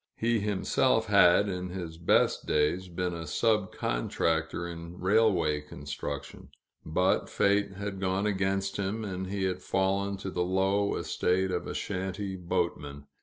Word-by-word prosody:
He 115 Hz, 0 st, +1 dB
himself 105 Hz, +3 st, +1 dB
had, 100 Hz, -1 st, +5 dB
in 90 Hz, -1 st, -3 dB
his 85 Hz, -3 st, -6 dB
best 85 Hz, -, +2 dB
days, 75 Hz, +5 st, +1 dB
been 90 Hz, 0 st, -2 dB
a 85 Hz, -1 st, -6 dB
sub 105 Hz, +1 st, +1 dB
contractor 80 Hz, +8 st, -1 dB
in 85 Hz, +1 st, -8 dB
railway 90 Hz, -7 st, +3 dB
construction; 75 Hz, -1 st, -7 dB, 0.3 s
but 90 Hz, +5 st, +1 dB
fate 100 Hz, 0 st, +2 dB
had 100 Hz, 0 st, -5 dB
gone 95 Hz, +1 st, 0 dB
against 95 Hz, -1 st, 0 dB
him, 100 Hz, +3 st, -2 dB
and 95 Hz, -1 st, -4 dB
he 100 Hz, 0 st, -2 dB
had 95 Hz, -1 st, -1 dB
fallen 100 Hz, +1 st, 0 dB
to 95 Hz, 0 st, -5 dB
the 90 Hz, -, -2 dB
low 95 Hz, +2 st, +1 dB
estate 95 Hz, +1 st, 0 dB
of 90 Hz, -, -2 dB
a -, -, -5 dB
shanty 95 Hz, 0 st, -3 dB
boatman. 70 Hz, -5 st, -3 dB
95 Hz, 145 wpm, -29 LUFS, 85-100 Hz, 0.3 s, had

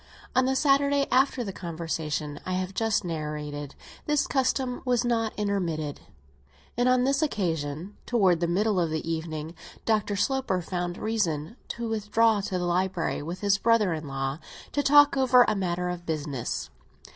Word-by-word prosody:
On 255 Hz, 0 st, +4 dB
the 265 Hz, +1 st, +1 dB
Sunday 280 Hz, 0 st, +3 dB
after 260 Hz, -1 st, +3 dB
the 195 Hz, -4 st, -5 dB
conversation 160 Hz, -4 st, -4 dB
I 185 Hz, -, -3 dB
have 185 Hz, +1 st, -2 dB
just 220 Hz, -2 st, 0 dB
narrated, 150 Hz, -3 st, -4 dB, 0.3 s
this 295 Hz, -1 st, +2 dB
custom 260 Hz, -2 st, 0 dB
was 245 Hz, -1 st, +1 dB
not 225 Hz, -2 st, +1 dB
intermitted 175 Hz, -8 st, -2 dB, 0.8 s
and 245 Hz, +1 st, +2 dB
on 255 Hz, 0 st, +4 dB
this 275 Hz, +2 st, +2 dB
occasion, 170 Hz, -, -2 dB
towards 190 Hz, -8 st, +3 dB
the 170 Hz, -, +2 dB
middle 200 Hz, +3 st, +1 dB
of 170 Hz, -2 st, +1 dB
the 160 Hz, +1 st, -3 dB
evening, 160 Hz, -1 st, -4 dB, 0.3 s
Dr. 215 Hz, -2 st, +1 dB
Sloper 260 Hz, -3 st, 0 dB
found 175 Hz, 0 st, -3 dB
reason 200 Hz, -5 st, -1 dB
to 235 Hz, 0 st, -4 dB
withdraw 220 Hz, 0 st, +2 dB
to 190 Hz, -1 st, -2 dB
the 180 Hz, -, -1 dB
library, 180 Hz, -1 st, 0 dB
with 170 Hz, +5 st, -6 dB
his 200 Hz, -1 st, +2 dB
brother 220 Hz, -4 st, +3 dB
in 155 Hz, -2 st, -5 dB
law, 135 Hz, +1 st, -3 dB, 0.3 s
to 290 Hz, -, +1 dB
talk 290 Hz, +1 st, +6 dB
over 255 Hz, -2 st, +6 dB
a -, -, +2 dB
matter 180 Hz, -2 st, -1 dB
of 175 Hz, -1 st, -5 dB
business. 145 Hz, -6 st, -3 dB
190 Hz, 160 wpm, -27 LUFS, 160-235 Hz, 0.8 s, talk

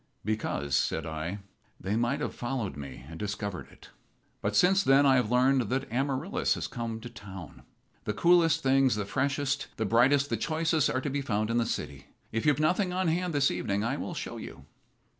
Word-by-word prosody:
"Because," 70 Hz, -10 st, -1 dB
said 75 Hz, +3 st, 0 dB
I, 80 Hz, +5 st, -4 dB, 0.4 s
"they 100 Hz, +3 st, -2 dB
might 120 Hz, +1 st, 0 dB
have -, -, -2 dB
followed 120 Hz, -5 st, -3 dB
me 70 Hz, -2 st, -8 dB
and 80 Hz, +1 st, -9 dB
discovered 100 Hz, -2 st, -4 dB
it. -, -, -16 dB, 0.5 s
But -, -, -1 dB
since 190 Hz, +2 st, +5 dB
then 140 Hz, -3 st, +5 dB
I 135 Hz, -1 st, +5 dB
have 125 Hz, -4 st, +1 dB
learned 125 Hz, +1 st, +3 dB
that 130 Hz, +2 st, -1 dB
Amaryllis 135 Hz, +1 st, 0 dB
has -, -, -4 dB
come 115 Hz, -1 st, -4 dB
to 120 Hz, -, -7 dB
town. 95 Hz, -7 st, -10 dB, 0.4 s
The 105 Hz, -, -1 dB
coolest 170 Hz, +2 st, +4 dB
things, 135 Hz, -2 st, +4 dB
the 105 Hz, -1 st, -2 dB
freshest, 140 Hz, +6 st, -1 dB
the 110 Hz, -, 0 dB
brightest, 135 Hz, +6 st, +3 dB
the -, -, +1 dB
choicest, 160 Hz, -1 st, +1 dB
are 130 Hz, -, 0 dB
to 145 Hz, -, -2 dB
be 140 Hz, +1 st, -1 dB
found 110 Hz, -4 st, -1 dB
in 115 Hz, -, +1 dB
the 115 Hz, -1 st, +1 dB
city. -, -, -5 dB, 0.2 s
If 115 Hz, +5 st, -1 dB
you've 145 Hz, -1 st, +4 dB
nothing 180 Hz, +5 st, +2 dB
on 185 Hz, -1 st, 0 dB
hand 175 Hz, +2 st, 0 dB
this 145 Hz, -3 st, +2 dB
evening 100 Hz, -2 st, -1 dB
I 120 Hz, +4 st, 0 dB
will -, -, -5 dB
show -, -, -5 dB
you." 65 Hz, -, -9 dB
125 Hz, 195 wpm, -29 LUFS, 105-145 Hz, 0.5 s, since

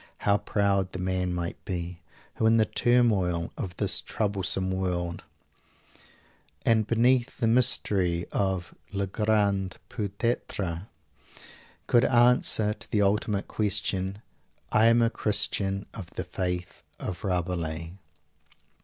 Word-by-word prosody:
How 100 Hz, 0 st, +4 dB
proud 100 Hz, -2 st, 0 dB
the -, -, -4 dB
man 90 Hz, 0 st, -1 dB
might 85 Hz, -1 st, -4 dB
be, 85 Hz, -2 st, -5 dB, 0.4 s
who 110 Hz, -, +3 dB
in 115 Hz, +1 st, +5 dB
the 110 Hz, -, +4 dB
turmoil 100 Hz, -10 st, +2 dB
of 90 Hz, -2 st, -6 dB
this -, -, +1 dB
troublesome 95 Hz, -3 st, -2 dB
world 90 Hz, -2 st, -2 dB, 1.4 s
and 110 Hz, -2 st, +3 dB
beneath 120 Hz, +2 st, +2 dB
the 120 Hz, -, 0 dB
mystery 95 Hz, -7 st, +3 dB
of 95 Hz, -3 st, -1 dB, 0.2 s
"le 100 Hz, -1 st, -1 dB
grand 100 Hz, -2 st, 0 dB
Peut 100 Hz, -3 st, -4 dB
être" 100 Hz, -6 st, -2 dB, 1.0 s
could 120 Hz, 0 st, +4 dB
answer 120 Hz, -3 st, +4 dB
to 110 Hz, +1 st, -9 dB
the 105 Hz, -2 st, +2 dB
ultimate 100 Hz, 0 st, 0 dB
question, 100 Hz, -1 st, -1 dB, 0.5 s
"I 110 Hz, +1 st, +5 dB
am 115 Hz, 0 st, +5 dB
a 115 Hz, -, +2 dB
Christian 100 Hz, -2 st, 0 dB
of 95 Hz, -6 st, -7 dB
the -, -, -5 dB
faith 90 Hz, -1 st, -4 dB, 0.2 s
of 90 Hz, -2 st, -5 dB
Rabelais!" 85 Hz, -3 st, -2 dB
100 Hz, 120 wpm, -27 LUFS, 90-110 Hz, 1.4 s, in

